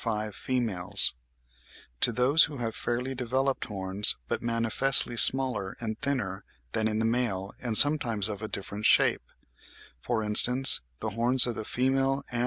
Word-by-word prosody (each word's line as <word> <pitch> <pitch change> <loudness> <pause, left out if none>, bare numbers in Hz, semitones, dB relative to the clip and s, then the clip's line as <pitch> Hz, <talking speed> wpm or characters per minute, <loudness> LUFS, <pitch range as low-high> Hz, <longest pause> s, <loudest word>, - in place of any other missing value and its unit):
105.))—to 90 - -4
those 125 +7 +2
which 145 -4 -10
have 115 -2 -5
fairly 125 +2 -5
developed 130 +2 -4
horns, 100 -1 0
but - - -5
manifestly 115 +2 +1
smaller 125 -6 +4
and 110 -2 -8
thinner 105 -9 -5 0.3
than 110 +7 -2
in 110 0 -4
the 110 - -2
male 110 -5 -4
and 115 -4 +3
sometimes 120 -8 +4
of 105 -1 -6
a 110 - -6
different 100 +1 -4
shape - - +2 0.8
(12. - - -24
For 115 -3 -3
instance 125 +5 +6 0.2
the - - -5
horns 120 +4 +2
of 120 - -4
the 110 - -9
female 135 +3 -2
Ant. 120 - -5
115 Hz, 150 wpm, -25 LUFS, 105-130 Hz, 0.8 s, instance